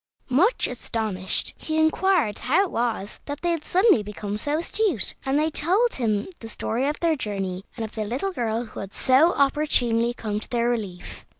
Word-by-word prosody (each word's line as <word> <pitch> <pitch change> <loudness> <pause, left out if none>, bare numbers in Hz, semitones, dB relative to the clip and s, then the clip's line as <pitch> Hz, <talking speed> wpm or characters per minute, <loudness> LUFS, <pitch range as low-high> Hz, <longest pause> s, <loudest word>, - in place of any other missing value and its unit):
Much 365 - +3
astonished, 220 -6 -2
he 315 0 -2
inquired 315 - +2
how 305 +10 +3
it 385 - -4
was 230 -4 -2
that 285 0 -5
they 345 - +1
had 330 -3 -2
suddenly 375 - +4
become 205 0 -5
so 290 +8 0
astute, 345 - +1
and 270 +1 +2
they 310 +1 +1
told 390 +12 +2
him 215 -5 0
the 225 - -8
story 240 +4 -1
of 295 - -2
their 335 -2 +3
journey, 195 -6 -4
and 225 - -2
of 220 - -10
the 220 - -2
little 255 - -2
girl 230 -4 -1
who 220 - -10
had 195 0 -7
so 275 +7 +4
opportunely 250 -5 +2
come 215 -3 -3
to - - -6
their 235 -1 +1
relief. 205 -7 -4
245 Hz, 190 wpm, -24 LUFS, 215-315 Hz, -, suddenly